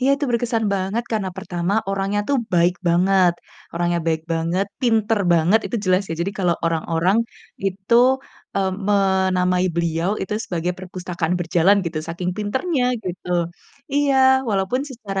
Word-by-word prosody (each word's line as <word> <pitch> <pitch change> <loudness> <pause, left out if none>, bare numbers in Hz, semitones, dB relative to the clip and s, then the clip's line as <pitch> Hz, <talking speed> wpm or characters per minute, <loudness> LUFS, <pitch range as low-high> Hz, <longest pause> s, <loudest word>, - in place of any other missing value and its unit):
Iya, 260 - +2
itu 290 - -2
berkesan 230 -1 0
banget 195 +5 -2
karena 205 -3 0
pertama, 180 -1 -3 0.2
orangnya 195 +1 0
tuh 280 - +3 0.2
baik 175 +1 +3
banget 180 +1 +4 0.4
orangnya 175 0 0
baik 160 -1 0
banget, 170 +4 0
pinter 225 -3 +2
banget 170 +6 +4
itu 240 - -3
jelas 185 +1 +3
ya. - - -1
Jadi 195 +3 -3
kalau 180 -2 +2
orang-orang 165 +4 +1 0.5
itu, 195 +4 -1 0.6
eee, 190 -1 +1 0.2
menamai 190 -2 +2
beliau 170 +2 0
itu 190 - -4
sebagai 175 0 -2
perpustakaan 180 -2 -3
berjalan 175 +3 +3
gitu 160 -2 -3
saking 175 +2 -3
pintarnya 255 - -1 0.2
gitu. 180 -1 -6 0.6
Iya, 285 -1 +2 0.3
walaupun 200 +6 0
secara 200 -6 -5
190 Hz, 140 wpm, -21 LUFS, 175-205 Hz, 0.6 s, banget